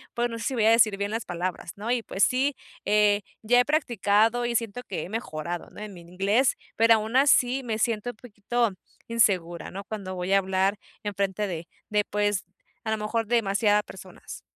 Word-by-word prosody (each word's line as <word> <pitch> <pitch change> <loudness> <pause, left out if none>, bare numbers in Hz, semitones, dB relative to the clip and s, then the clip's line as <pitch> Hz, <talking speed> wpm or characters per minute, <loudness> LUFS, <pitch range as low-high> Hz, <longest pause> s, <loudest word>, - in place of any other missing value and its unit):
pues, 240 0 0
no 230 - -5
sé - - -5
si 270 - -1
voy 220 -3 +2
a 225 - +6
decir 220 -3 +4
bien 200 +1 -2
las 225 +1 -3
palabras, 175 0 -4
¿no?, 215 +4 -3
y 245 -1 +1
pues 195 - -1
sí, 270 +2 +2 0.3
eh, 210 -1 +3 0.2
ya 245 +3 +4
he 245 - +4
practicado 235 - +2
y 240 - -1
siento 230 +1 -1
que 190 - -4
he - - -8
mejorado, 175 -6 -4
¿no?, - - -12
en 210 -2 -7
mi 175 - -11
inglés, 195 +9 +1 0.2
pero 225 0 +6
aún 220 +3 -3
así 265 -1 +4
me 225 -3 -2
siento 230 +1 0
un - - -22
poquito 230 0 -1 0.4
insegura, 180 -8 +1
¿no?, 195 +1 -6
cuando 195 -3 -6
voy 180 +2 -1
a 195 - +6
hablar 190 +1 +1 0.3
enfrente 200 0 -1
de 170 -3 -5 0.2
de, 210 -1 +2
pues, 205 -2 0 0.4
a 220 - -2
lo 220 - +1
mejor 220 +1 -2
demasiada 210 -2 +2
personas. - - -11
210 Hz, 200 wpm, -26 LUFS, 195-235 Hz, 0.4 s, a